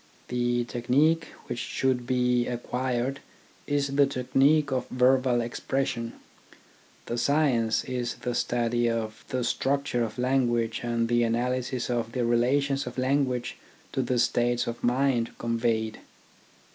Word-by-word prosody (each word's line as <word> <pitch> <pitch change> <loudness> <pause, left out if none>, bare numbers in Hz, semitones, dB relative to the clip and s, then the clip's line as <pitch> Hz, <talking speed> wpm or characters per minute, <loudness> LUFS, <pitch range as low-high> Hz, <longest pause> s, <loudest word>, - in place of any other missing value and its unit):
The 120 0 +1
technique 140 +8 +2 0.2
which 120 0 -4
should 125 +1 -1
be 125 -1 +2
acquired 125 +2 -2 0.5
is 145 -1 0
the 140 -1 +6
technique 140 +3 +2
of 130 -1 -1
verbal 125 -1 +3
expression, 115 0 -2 0.9
the 120 - -3
science 120 -4 +2
is 125 -2 -3
the 125 - -4
study 120 0 +1
of 110 -1 -3
the 130 - -2
struc 135 +3 0
ture 120 -4 -1
of 110 0 -5
language 120 -3 +1
and 115 -1 0
the 120 0 +2
analysis 125 +2 -1
of 115 -2 -2
the 125 -2 0
relations 135 +4 +1
of - - -7
language 130 -2 0 0.3
to 130 - 0
the 125 0 0
states 120 0 +2
of 120 0 -5
mind 125 -1 +1
conveyed. 115 -2 -1
125 Hz, 135 wpm, -27 LUFS, 120-130 Hz, 0.9 s, the